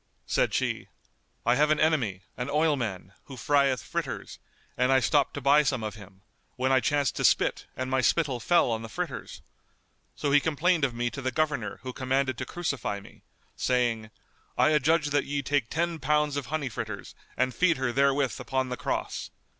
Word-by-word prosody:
Said - - +1
she, - - -1 0.6
"I 120 - +4
have 150 +4 +3
an 155 0 +3
enemy, 125 - +1
an 125 - -4
oilman, 135 - 0
who 135 -3 -10
frieth 140 0 +2
fritters, - - -5 0.4
and 125 +1 +2
I 135 - +6
stopped 140 +2 +2
to 145 - -4
buy 140 +3 +5
some 135 -5 -1
of 105 -1 -3
him, 100 -2 -14 0.3
when 130 +1 0
I 130 - +5
chanced 145 0 +1
to - - -1
spit - - +2
and 130 +1 -2
my 130 0 +2
spittle 135 -1 +1
fell 170 -1 +3
on 110 0 -1
the 115 - -8
fritters. - - -5 0.7
So 145 - -1
he 145 - +6
complained 160 +2 +1
of 130 -3 +1
me 120 0 -1
to 135 - -6
the 130 - 0
Governor 145 -5 -1
who 130 -1 -5
commanded 130 0 0
to - - -4
crucify 140 -12 -3
me, - - -16 0.3
saying, 120 -4 0 0.5
'I - - +5
adjudge 155 +1 +3
that 145 - +2
ye 140 0 -2
take 135 -4 0
ten 170 +1 -1
pounds 150 +1 +1
of 145 -2 -3
honey 155 -2 -2
fritters 105 - -6 0.2
and 130 0 +1
feed 175 -3 +3
her 130 -2 0
therewith 140 -2 +2
upon 130 -1 -1
the 125 - -3
cross. - - -3
135 Hz, 190 wpm, -27 LUFS, 125-150 Hz, 0.7 s, I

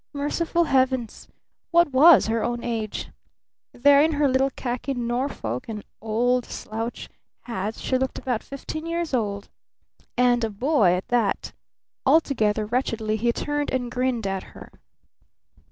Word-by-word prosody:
Merciful 320 +4 0
Heavens! 260 -5 0 0.4
what 340 -3 +4
was 295 +4 +7
her 225 0 0
"own 240 0 -2
age"? 225 -3 -4 0.6
There 280 +3 +5
in 315 +1 +3
her 290 -1 +2
little 265 +1 +2
khaki 255 +1 -4
Norfolk 240 - -3
and 210 -2 -5 0.2
old 240 +3 +1
slouch 225 +2 -5 0.3
hat 215 -2 -4
she 255 - -1
looked 265 0 -2
about 245 -4 -2
fifteen 310 +3 -7
years 335 -2 -2
old 205 -4 -2 0.7
and 245 -1 +3
a 225 - 0
boy, 215 - +2
at 180 +1 -3
that. 235 -5 0 0.5
Altogether 230 -8 +2
wretchedly 225 -2 -1
he 235 +2 +1
turned 290 +4 -2
and 245 -2 -2
grinned 250 -3 -1
at 195 -1 -2 0.2
her. - - -12
245 Hz, 135 wpm, -24 LUFS, 220-275 Hz, 0.7 s, was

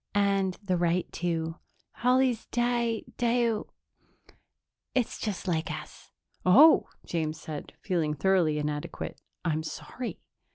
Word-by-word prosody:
And 195 -2 +2
the 185 -3 +1
right 175 +1 +2
two. 165 -1 -2 0.4
Holly's 250 -1 +2
di 240 -2 0
dio 235 -2 +1 1.3
it's 255 -3 0
just 200 -3 -3
like 165 -2 0
us." - - -8 0.3
"Oh," 275 - +7 0.2
James 160 -2 -2
said, 150 -2 -7
feeling 165 -6 0
thoroughly 170 -2 +3
inadequate. 150 0 -4 0.2
"I'm 160 -2 +1
sorry." 235 +9 -6
185 Hz, 110 wpm, -29 LUFS, 160-235 Hz, 1.3 s, Oh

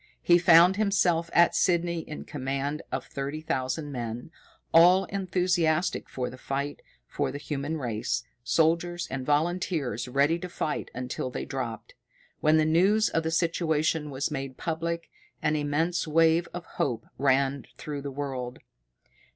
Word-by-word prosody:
He 175 0 +6
found 175 +2 +6
himself 180 -5 +2
at 170 0 +5
Sydney 170 -2 +2
in 155 -1 -7
command 140 +2 -3
of - - -3
thirty 140 +2 -4
thousand 145 0 -2
men, 120 +2 -5 0.4
all 180 +3 +7
enthusiastic 180 -3 0
for 125 -1 -3
the 130 - -11
fight 140 +2 -3 0.2
for - - -2
the - - -5
human 145 +2 -3
race, 120 -2 -2 0.2
soldiers 170 +5 +1
and 130 0 -3
volunteers 150 - 0
ready 140 +6 +2
to 180 - -6
fight 155 -3 -3
until 130 0 -3
they - - -5
dropped. 125 -4 -5 0.5
When 155 +1 +4
the 155 - +3
news 195 +7 +3
of 165 - 0
the 160 - -2
situation 160 -2 0
was 140 +2 -2
made 135 -2 -5
public, 165 0 -3 0.3
an 155 - +1
immense 155 +4 0
wave 165 +2 +3
of 175 -1 -7
hope 115 -2 -2
ran 135 0 +2
through 145 -2 -5
the 140 - -5
world. 130 -3 -4
155 Hz, 145 wpm, -27 LUFS, 135-170 Hz, 0.5 s, all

